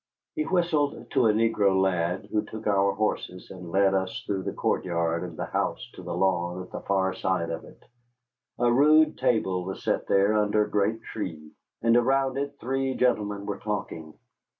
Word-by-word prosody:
He 310 Hz, -1 st, -2 dB
whistled 170 Hz, -6 st, 0 dB
to 130 Hz, -4 st, +3 dB
a -, -, +5 dB
negro 105 Hz, -3 st, +2 dB
lad, 90 Hz, -1 st, 0 dB
who 105 Hz, -, +2 dB
took 110 Hz, +1 st, -9 dB
our 100 Hz, -1 st, +3 dB
horses, 90 Hz, -4 st, -3 dB
and 90 Hz, -2 st, -9 dB
led 95 Hz, +2 st, +3 dB
us 95 Hz, -1 st, -2 dB
through 100 Hz, -2 st, -2 dB
the -, -, -3 dB
court -, -, -1 dB
yard 85 Hz, -2 st, -1 dB
and -, -, -7 dB
the -, -, -3 dB
house -, -, -2 dB
to -, -, -10 dB
the -, -, -5 dB
lawn 90 Hz, -1 st, 0 dB
at 90 Hz, -, -15 dB
the -, -, -5 dB
far 95 Hz, -1 st, 0 dB
side 90 Hz, -3 st, -1 dB
of 80 Hz, -, -5 dB
it. -, -, -17 dB, 0.7 s
A 120 Hz, 0 st, +3 dB
rude 155 Hz, +4 st, +5 dB
table 95 Hz, -6 st, +1 dB
was 95 Hz, +1 st, -6 dB
set -, -, -1 dB
there 100 Hz, +2 st, +3 dB
under 105 Hz, 0 st, +2 dB
a 105 Hz, -, -12 dB
great 105 Hz, +3 st, 0 dB
tree, 80 Hz, -8 st, -6 dB, 0.3 s
and 115 Hz, 0 st, +4 dB
around 135 Hz, +2 st, +2 dB
it 140 Hz, 0 st, -3 dB
three 135 Hz, +1 st, -1 dB
gentlemen 105 Hz, -5 st, 0 dB
were 100 Hz, -1 st, -4 dB
talking. 85 Hz, -7 st, -5 dB
100 Hz, 190 wpm, -26 LUFS, 95-120 Hz, 0.7 s, a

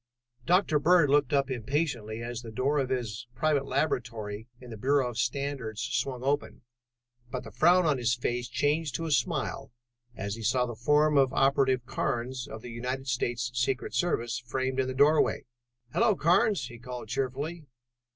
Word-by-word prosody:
] 120 Hz, 0 st, -36 dB
Dr. 180 Hz, -4 st, +3 dB
Bird 165 Hz, -2 st, +4 dB
looked 145 Hz, -3 st, +3 dB
up 140 Hz, -1 st, +1 dB
impatiently 120 Hz, -3 st, -2 dB
as 120 Hz, 0 st, -5 dB
the 115 Hz, -, -9 dB
door 130 Hz, +6 st, 0 dB
of 130 Hz, -2 st, -1 dB
his 120 Hz, -2 st, -3 dB
private 145 Hz, -3 st, +1 dB
laboratory 115 Hz, -7 st, -2 dB
in 125 Hz, -1 st, -11 dB
the -, -, -6 dB
Bureau 135 Hz, +4 st, +2 dB
of 115 Hz, -, -10 dB
Standards 125 Hz, -3 st, -2 dB
swung 125 Hz, +1 st, -2 dB
open, 140 Hz, -2 st, -1 dB, 0.7 s
but 130 Hz, 0 st, -4 dB
the -, -, -10 dB
frown 175 Hz, +2 st, +4 dB
on 145 Hz, -4 st, +2 dB
his 120 Hz, 0 st, +2 dB
face 120 Hz, 0 st, -2 dB
changed 145 Hz, +5 st, 0 dB
to 165 Hz, -, -2 dB
a 160 Hz, -, -3 dB
smile 125 Hz, -4 st, -1 dB, 0.4 s
as 100 Hz, 0 st, -4 dB
he 115 Hz, -, -7 dB
saw 125 Hz, +3 st, +2 dB
the 120 Hz, -, -5 dB
form 150 Hz, +5 st, +3 dB
of 135 Hz, -1 st, +3 dB
Operative 135 Hz, -2 st, +2 dB
Carnes 120 Hz, +1 st, -2 dB
of 110 Hz, +1 st, -9 dB
the 125 Hz, -, -7 dB
United 125 Hz, +3 st, -4 dB
States 120 Hz, -1 st, -1 dB
Secret 125 Hz, +2 st, -1 dB
Service 120 Hz, -9 st, 0 dB
framed 130 Hz, +2 st, -2 dB
in 130 Hz, -, +1 dB
the 130 Hz, -, -4 dB
doorway. 150 Hz, +3 st, +3 dB, 0.5 s
"Hello, 225 Hz, -2 st, +3 dB
Carnes," 180 Hz, -, +3 dB
he 120 Hz, -1 st, -10 dB
called 125 Hz, -2 st, -7 dB
cheerfully. 140 Hz, +6 st, -3 dB
130 Hz, 175 wpm, -29 LUFS, 120-145 Hz, 0.7 s, Bird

